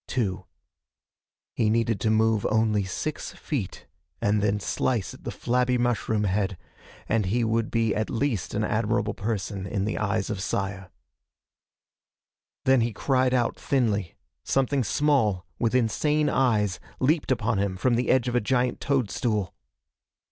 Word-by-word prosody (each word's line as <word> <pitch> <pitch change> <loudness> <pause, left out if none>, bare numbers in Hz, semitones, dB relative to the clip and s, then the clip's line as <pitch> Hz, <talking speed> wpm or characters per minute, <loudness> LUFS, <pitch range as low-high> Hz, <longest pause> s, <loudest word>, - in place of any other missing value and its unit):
Two. 95 -6 -2 1.1
He 110 - +1
needed 115 -1 +1
to 110 - 0
move 110 -1 +3
only 110 -2 +2
six 145 +11 -4
feet, 125 - -4 0.3
and 105 0 +1
then 105 0 +1
slice 110 0 -1
at - - -15
the - - -2
flabby 125 +1 +1
mushroom 115 -3 0
head, 95 -1 0 0.5
and 110 -3 +1
he 120 +5 +1
would 115 0 0
be 115 -2 +1
at 110 0 -1
least 120 -6 -1
an 105 - 0
admirable 110 +2 0
person 100 -2 -3
in 100 -1 -1
the 105 - -2
eyes 105 0 -1
of 100 -3 -3
Saya. 95 -1 -3 1.8
Then 130 -2 +5
he 115 0 0
cried 130 0 +1
out 120 -2 0
thinly. 105 -9 0 0.3
Something 135 0 +1
small, 110 -7 +1
with 115 0 +1
insane 150 +6 +2
eyes, 105 -8 +1 0.2
leaped 145 +1 +1
upon 110 -3 +1
him 100 -2 -1
from 125 +6 +2
the 120 +1 0
edge 130 -1 +3
of 120 - -1
a 125 - +2
giant 125 +2 0
toadstool. 115 -6 0
110 Hz, 150 wpm, -26 LUFS, 105-125 Hz, 1.8 s, Then